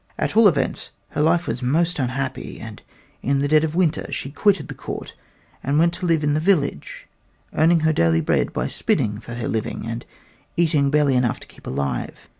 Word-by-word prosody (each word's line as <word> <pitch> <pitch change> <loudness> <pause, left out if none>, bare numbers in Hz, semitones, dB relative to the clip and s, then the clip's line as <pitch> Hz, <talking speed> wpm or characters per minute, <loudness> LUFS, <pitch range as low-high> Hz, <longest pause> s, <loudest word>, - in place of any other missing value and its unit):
At - - -1
all 225 -1 +8
events, 145 -8 0 0.2
her - - -2
life 165 +3 +3
was 125 - -3
most 165 +7 +1
unhappy, 130 +1 -3
and - - -9 0.4
in 140 +1 +1
the 140 +1 +1
dead 155 +1 +4
of 160 0 -2
winter 175 -4 +1
she 135 - -4
quitted 200 +5 +2
the - - -6
court - - -7 0.5
and 140 +2 +1
went 170 +2 +4
to 180 0 -3
live 165 -2 +2
in 145 0 +2
the 150 - +2
village, 155 - 0 0.5
earning 165 +1 +4
her 160 0 +3
daily 80 - +3
bread 80 - +1
by - - -2
spinning 105 -1 0
for 120 0 -8
her 120 -1 -3
living, 110 -1 -3
and 115 +1 -4 0.5
eating 155 -4 +3
barely 145 -1 +3
enough 125 -2 +1
to - - -13
keep - - -16
alive. 70 -2 -3
145 Hz, 200 wpm, -22 LUFS, 125-165 Hz, 0.5 s, all